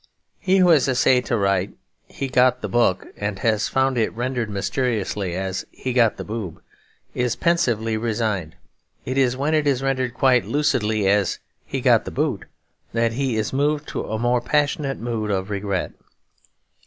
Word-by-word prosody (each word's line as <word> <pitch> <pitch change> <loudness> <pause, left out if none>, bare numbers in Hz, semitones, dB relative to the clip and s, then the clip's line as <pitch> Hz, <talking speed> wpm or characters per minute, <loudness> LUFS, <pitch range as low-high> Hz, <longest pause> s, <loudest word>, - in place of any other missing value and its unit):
He 190 0 +2
who 180 -2 +5
has 155 -5 +5
essayed 125 -1 +3
to 120 - +1
write 100 -1 0 0.3
'he 135 - -4
got 125 -1 +3
the - - -1
book,' 95 -3 +1
and 105 -1 -3
has 110 0 +1
found 135 -1 +1
it 110 - +1
rendered 120 -1 -2
mysteriously 100 -3 -2
as 95 0 -3
'he 130 - -5
got 115 -4 +3
the - - -5
boob' 105 -6 -6 0.5
is 125 -1 0
pensively 120 -11 +1
resigned. 110 -7 -2 0.5
It 130 - -3
is 130 -1 +2
when 145 +4 0
it 155 -2 +2
is 135 -2 +1
rendered 130 -3 -1
quite 125 -1 +3
lucidly 110 -8 +1
as 100 -1 +2 0.3
'he - - -3
got - - +4
the - - -4
boot' - - -2 0.5
that 115 0 +1
he 130 -2 -1
is 110 +2 -2
moved 145 +2 0
to - - -3
a 110 - -3
more 120 +2 +1
passionate 145 +1 0
mood 115 -2 -3
of 95 0 -2
regret. 100 -2 -2
120 Hz, 170 wpm, -22 LUFS, 105-135 Hz, 0.5 s, who